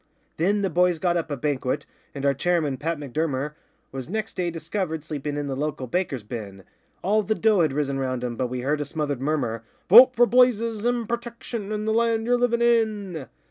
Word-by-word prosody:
Then 200 +5 +1
the 195 - +1
boys 180 +1 +3
got 175 +1 0
up 165 -2 -1
a 145 - -3
banquet, 140 0 -1 0.3
and 140 0 -4
our 140 - +4
chairman, 150 -2 0
Pat 165 +4 -2
M'Durmer, 145 0 -2 0.4
Was 130 0 -6
next 215 +2 -3
day 180 -2 -1
discovered 165 -1 -3
sleeping 150 -2 -4
in 145 - -2
the 135 -1 -3
local 145 -1 -3
baker's 140 - -2
bin 105 -4 -7 0.4
All 210 +3 +3
the 215 +2 -1
dough 215 -4 +3
had 155 -4 +2
risen 140 -1 -1
round 130 -2 -2
him, 120 -1 -3
but 125 +1 -1
we 125 0 -4
heard 145 +3 0
a - - -2
smothered 145 -2 -3
murmur, 130 -6 -1 0.3
'Vote 250 +6 +9
for 240 - +6
Blazes 230 -3 +3
and 240 -2 0
Protection 235 -2 -5
and 215 0 -2
the 220 - +2
land 230 -1 +1
ye're 245 +1 +3
livin' 240 -1 +1
in. 210 - +1
165 Hz, 205 wpm, -24 LUFS, 140-215 Hz, 0.4 s, Vote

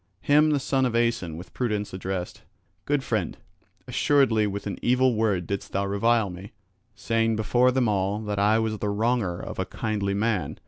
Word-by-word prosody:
Him 150 +1 +4
the 145 -2 +2
son 135 -1 +1
of 120 - -3
Aeson 115 -9 0
with 90 - -11
prudence 105 -6 -2
addressed: 95 -1 -4 0.4
"Good 145 -1 0
friend, 110 -9 -2 0.5
assuredly 125 -7 +2
with 100 0 -5
an 100 - -4
evil 125 +1 +3
word 105 -5 0
didst 100 +2 -5
thou 100 +1 0
revile 100 +1 +1
me, 95 +3 -10 0.4
saying 115 0 0
before 120 +4 +3
them 125 -1 +1
all 100 -1 0
that 105 -1 -3
I 105 +2 +4
was 110 -1 -1
the 105 - -1
wronger 105 -4 0
of - - -7
a 95 - 0
kindly 100 0 -2
man. 105 -1 -1
110 Hz, 180 wpm, -25 LUFS, 100-120 Hz, 0.5 s, Him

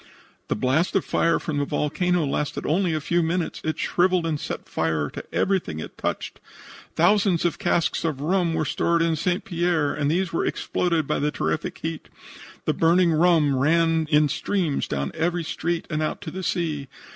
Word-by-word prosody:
"The - - 0
blast 130 - +1
of 195 - +2
fire 170 - +2
from 150 -3 -3
the 145 - 0
volcano 165 +4 0
lasted 145 +1 -2
only 170 +1 +1
a - - 0
few 170 +4 +1
minutes. 170 +1 -1
It 155 - -2
shriveled 180 -1 +2
and 155 -3 -1
set - - -5
fire 80 -3 -1
to - - -7
everything 185 - 0
it - - -8
touched. - - -4 0.6
Thousands 185 0 +3
of 175 - 0
casks 175 -6 +1
of 155 -5 -1
rum 170 +2 +1
were 155 - 0
stored 170 +4 +1
in 165 -1 +1
St. 180 +4 -1
Pierre, 170 -4 0
and 145 -1 0
these 175 +2 0
were - - +1
exploded 170 -4 0
by - - -1
the 150 - +1
terrific 80 - -2
heat. - - -5 0.6
The - - +2
burning 170 +1 +3
rum 160 -3 +4
ran 160 +3 +2
in 150 -1 +4
streams 170 -1 -1
down 70 -1 -2
every 175 +1 -1
street 165 +1 -2
and 155 0 -1
out 155 - -2
to 170 -5 -6
the 190 - -5
sea. 155 -6 -2
165 Hz, 185 wpm, -24 LUFS, 150-175 Hz, 0.6 s, rum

